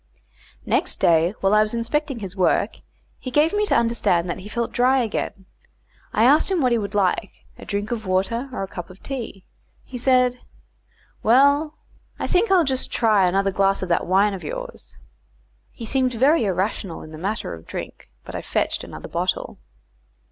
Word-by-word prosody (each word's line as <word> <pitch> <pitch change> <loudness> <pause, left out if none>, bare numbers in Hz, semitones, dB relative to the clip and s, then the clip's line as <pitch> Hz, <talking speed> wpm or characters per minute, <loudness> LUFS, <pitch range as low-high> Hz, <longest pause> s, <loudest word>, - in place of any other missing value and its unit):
Next - - +1
day, 170 +4 +3
while 195 +1 +2
I 215 - +6
was 215 +2 0
inspecting 250 +2 -2
his 195 -1 -6
work, 185 -2 +1 0.4
he 255 - -6
gave 300 +7 +2
me 420 0 +2
to - - +2
understand 230 -7 +1
that - - -5
he 195 +3 -10
felt 235 +1 -2
dry 255 +2 +3
again. 200 -3 -4 0.7
I 220 - +2
asked 285 +9 +5
him 380 -2 +1
what 255 -4 +2
he 235 - +3
would 205 0 -5
like, 200 +1 +1 0.3
a - - -10
drink 205 +1 -3
of 220 -4 -4
water 195 +8 0
or 250 - -4
a - - -4
cup 175 -2 -8
of 185 +1 -15
tea? 235 -8 -6 0.4
He 250 - -8
said, 250 0 +3 0.8
"Well, 280 +6 +4 0.4
I - - -3
think 375 +5 +2
I'll 375 -3 +5
just 265 -3 -1
try 215 -5 +3
another 195 +2 +1
glass 195 0 +1
of 185 - -5
that 170 - +1
wine 195 +3 +3
of 190 - -7
yours." - - -7 0.7
He 230 - -8
seemed 255 +1 0
very 265 +2 +3
irrational 190 -1 -2
in 155 - -11
the 155 - -9
matter 205 +5 -3
of 80 -1 -11
drink, - - -8 0.2
but - - -9
I - - -3
fetched - - -1
another - - -9
bottle. - - -2
225 Hz, 185 wpm, -22 LUFS, 195-260 Hz, 0.8 s, I